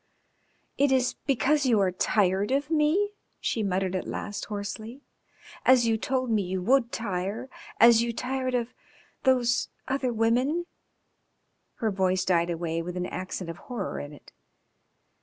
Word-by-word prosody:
"It 285 0 +4
is 255 -2 +2
because 280 +1 +2
you 230 -4 +4
are 190 -2 +2
tired 190 +1 +1
of 280 +3 0
me?" 320 +7 +2 0.3
she 225 - -1
muttered 190 -2 0
at 185 - -3
last 205 - -4
hoarsely, 215 +5 -6 0.3
" - - -19
as 255 -2 +5
you 225 -1 +3
told 255 +2 -1
me 215 -2 +3
you 185 0 -2
would 240 +5 +2
tire, 200 +3 -3 0.3
as 235 -1 +7
you 235 0 0
tired 255 +2 -2
of 240 0 -2 0.5
those 245 -2 +3 0.2
other 265 -2 0
women?" 245 +9 +1 1.1
Her 225 -3 -1
voice 190 -1 +1
died 175 -2 +2
away 165 -1 -2
with 180 +2 -5
an 180 - -1
accent 185 -1 -5
of 165 - -11
horror 235 -7 -5
in 145 - -7
it. 145 - -15
225 Hz, 155 wpm, -27 LUFS, 185-260 Hz, 1.1 s, as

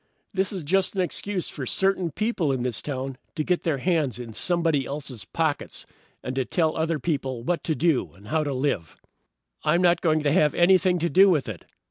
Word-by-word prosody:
"This 190 0 0
is 190 -5 -4
just 190 +6 +1
an 190 - +1
excuse 185 +1 -2
for 135 -4 -6
certain 190 -2 +1
people 185 -3 -1
in 130 -2 -1
this 125 -3 -2
town 135 -2 -4 0.2
to 155 - -1
get 180 +2 0
their 160 -4 0
hands 150 - 0
in 120 -2 -7
somebody 165 - +1
else's 135 -8 -6
pockets, 160 +4 -2 0.4
and 130 - -4
to 135 - +2
tell 160 +3 0
other 160 0 0
people 135 -5 -2
what 170 +4 -1
to 160 - 0
do 165 -5 +1
and 100 +2 -15
how 160 0 +1
to 145 - -2
live. 130 - -2 0.7
"I'm 175 +2 +2
not 175 -1 +4
going 155 -2 +2
to 145 - +2
have 155 -3 +3
anything 180 0 +4
to 170 0 0
do 195 +2 +7
with 150 -8 +2
it. 105 -6 -7
155 Hz, 205 wpm, -25 LUFS, 135-175 Hz, 0.7 s, do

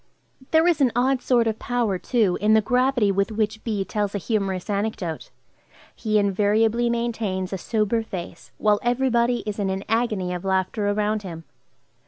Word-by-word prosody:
There 320 +1 +4
is 335 -4 +2
an 255 -3 +4
odd 255 +1 +2
sort 240 -3 +2
of 220 -1 -1
power, 235 -6 -1
too, 215 -7 +1
in 215 +1 +4
the 220 - +5
gravity 250 -1 +2
with 200 +2 0
which 215 0 -2
B. 210 -4 -2
tells 205 -1 -2
a - - +1
humorous 195 -3 -2
anecdote. 200 -5 -3 0.7
He 215 -2 0
invariably 210 +4 +2
maintains 225 -6 -2
a 190 - -3
sober 220 +3 0
face 185 -6 -8
while 210 -1 +2
every 245 +2 +1
body 240 +1 +1
is 210 0 -4
in 195 -1 0
an 190 +1 -3
agony 215 -5 0
of 180 0 -5
laughter 190 +2 0
around 210 +1 0
him. 170 -4 -8
215 Hz, 175 wpm, -23 LUFS, 195-235 Hz, 0.7 s, the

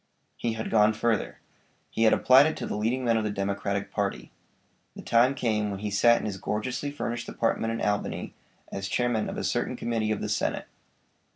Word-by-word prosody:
He 115 -1 -2
had 110 0 -5
gone 110 -1 +5
further. 110 -1 -1 0.5
He 115 - +1
had 110 - +6
applied 130 +3 +6
it 155 - -3
to - - -4
the - - -3
leading 120 +5 -1
men 115 -1 +3
of 110 - 0
the 105 - -1
Democratic 100 0 -2
party. 100 - -3 0.6
The - - -9
time 120 +4 +3
came 110 -5 0
when 100 -1 -5
he 105 -1 -3
sat 120 +3 +5
in - - -5
his 100 -3 -3
gorgeously 125 +9 -3
furnished 120 -4 -4
apartment 115 0 0
in 115 - -1
Albany, 105 -1 -2 0.4
as 95 0 -4
Chairman 120 +2 0
of - - -5
a - - -3
certain - - -1
committee 115 -2 -1
of 110 - -1
the - - -3
Senate. 105 -2 -1
110 Hz, 200 wpm, -27 LUFS, 105-120 Hz, 0.6 s, had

